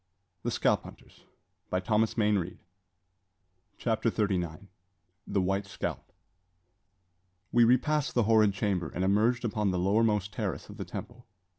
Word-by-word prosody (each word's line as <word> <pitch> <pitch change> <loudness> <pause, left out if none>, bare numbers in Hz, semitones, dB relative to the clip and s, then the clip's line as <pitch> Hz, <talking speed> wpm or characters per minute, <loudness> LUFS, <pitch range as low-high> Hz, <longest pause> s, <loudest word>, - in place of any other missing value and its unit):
Perhaps, - - -2
in - - -17
God's - - +3 0.9
mercy, 105 +4 +1
she - - -11
may 110 - +3
yet 105 - +3
remember." 95 -3 -1 1.2
CHAPTER 115 0 0
THIRTY 105 -3 0
NINE. 85 +3 -6 0.6
THE 100 - +1
WHITE 95 +2 -1
SCALP. - - -5 1.4
We 120 - +5
repassed 130 +5 +2
the 120 - +4
horrid 110 -1 +4
chamber, 95 -6 -1
and 90 - -3
emerged 110 +6 +2
upon 105 -2 0
the 90 - 0
lowermost 105 +2 +2
terrace 100 -10 -4
of - - -10
the - - -5
temple. 120 -1 -8
105 Hz, 145 wpm, -29 LUFS, 95-115 Hz, 1.4 s, We